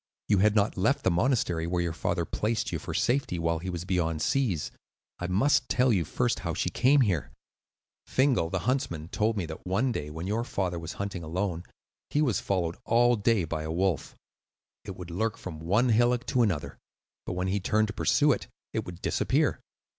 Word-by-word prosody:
You 100 -2 +3
had 105 +2 +4
not 105 0 +2
left 125 +10 +2
the 95 - +3
monastery 90 -5 +1
where 85 0 0
your 85 -1 -2
father 85 +1 -1
placed 110 +5 -1
you - - -2
for - - -6
safety 125 -8 0
while 85 0 0
he 95 +3 -5
was 85 -1 -4
beyond 85 -4 0
seas. 100 - 0 0.5
I 90 - -3
must 125 +7 +2
tell 125 -1 +3
you 90 -5 +1
first 120 +6 0
how 85 -3 -3
she - - -1
came 135 +3 +4
here. 95 - +1 0.8
"Fingal, 130 -11 +2
the 95 0 -2
huntsman, 85 - -1
told 110 +2 0
me 95 - -1
that 80 0 -8
one 110 +8 +1
day, 75 -10 -4
when 80 +3 -6
your 110 +4 0
father 90 -7 -2
was 85 0 -6
hunting 100 -2 -4
alone, 85 +1 -3 0.4
he 145 - 0
was 130 -10 +2
followed 85 -4 -1
all 120 +1 +4
day 110 -2 +2
by 80 -1 -3
a 80 0 -4
wolf. 90 -1 -1 0.7
It - - -6
would 90 -1 -8
lurk 110 +5 -1
from 80 -4 -7
one 105 +10 +2
hillock 120 +2 +3
to 125 - +1
another, 95 -10 -1 0.5
but - - -2
when 90 +1 -1
he 100 +2 0
turned 110 +3 +1
to - - -4
pursue 150 +6 +3
it, - - -1 0.3
it 110 - -1
would 90 0 -9
disappear. - - +1
95 Hz, 200 wpm, -28 LUFS, 85-115 Hz, 0.8 s, had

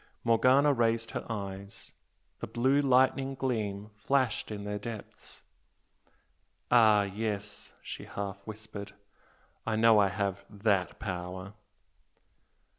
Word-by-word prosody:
Morgana 130 +5 +5
raised 115 -2 +1
her - - -4
eyes, 100 -2 -6 0.5
the - - -5
blue 130 +4 +2
lightning 135 0 +3
gleam 105 -6 -2
flashed 130 +1 0
in 105 -2 -5
their 105 0 -3
depths. 110 0 -9 1.3
"Ah, 110 -4 +6
yes!" 105 0 -3
she - - -7
half 100 -1 -5
whispered 105 -2 -8 0.7
"I 115 - -1
know 110 -1 +6
I 100 - +5
have 100 0 -2
THAT 100 -3 0
power!" 95 0 -5
105 Hz, 110 wpm, -30 LUFS, 100-120 Hz, 1.3 s, Ah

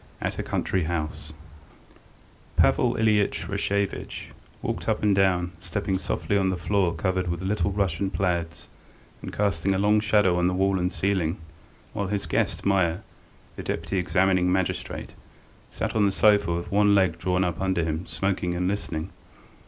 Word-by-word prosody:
AT - - -3
A - - +1
COUNTRY 95 -4 -1
HOUSE 80 -2 -3 1.3
PAVEL - - +3
ILYITCH 105 -5 +1
RASHEVITCH 100 0 -2 0.3
walked - - -2
up - - 0
and 105 -2 +4
down, 90 -2 +2
stepping 95 +2 -2
softly 100 - -2
on 95 -1 +2
the 95 - -1
floor 90 -1 +1
covered 95 +1 -1
with 85 +1 -3
little 100 -1 0
Russian 95 -1 0
plaids, 85 -3 -2 0.5
and - - -6
casting 95 -2 0
a - - +1
long 105 +2 +3
shadow 105 -4 +3
on 90 - +2
the 90 - 0
wall 95 0 +2
and 90 +1 0
ceiling 95 -4 0 0.6
while 100 -2 -2
his 100 0 -2
guest, - - -1
Meier, 95 -1 +2 0.5
the - - -6
deputy 85 +4 -2
examining 90 0 +2
magistrate, 95 -1 -2 0.6
sat - - -3
on 105 -2 +4
the - - +1
sofa 100 -2 +4
with 85 +2 -3
one 100 0 +4
leg 95 -4 +2
drawn 90 +1 +1
up 90 -1 -2
under 95 -3 +1
him 80 +2 -3
smoking 95 -3 -1
and 90 +1 0
listening. 95 -3 -3
95 Hz, 160 wpm, -25 LUFS, 90-100 Hz, 1.3 s, and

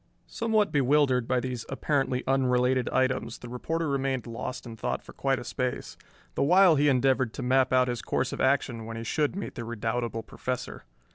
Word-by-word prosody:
Somewhat 220 -3 0
bewildered 135 -3 +3
by 130 -1 +2
these 125 -2 -4
apparently 135 -2 0
unrelated 130 -1 +2
items, 130 -3 0
the 120 - -10
reporter 160 +7 -2
remained 135 -3 -1
lost 125 +2 -6
in 115 -1 -8
thought - - -3
for - - -13
quite - - 0
a - - -6
space, - - -3 0.4
the - - -2
while 180 +3 +6
he 145 0 +3
endeavored 130 -2 +2
to 130 - -5
map 130 +1 +3
out 130 0 +4
his 120 -2 -2
course - - -1
of - - -4
action 130 -4 +1
when 115 0 -6
he 115 - -5
should 150 +7 0
meet 200 - -5
the 120 - -6
redoubtable 115 0 -3
Professor. 125 +4 -5
130 Hz, 190 wpm, -27 LUFS, 120-140 Hz, 0.4 s, while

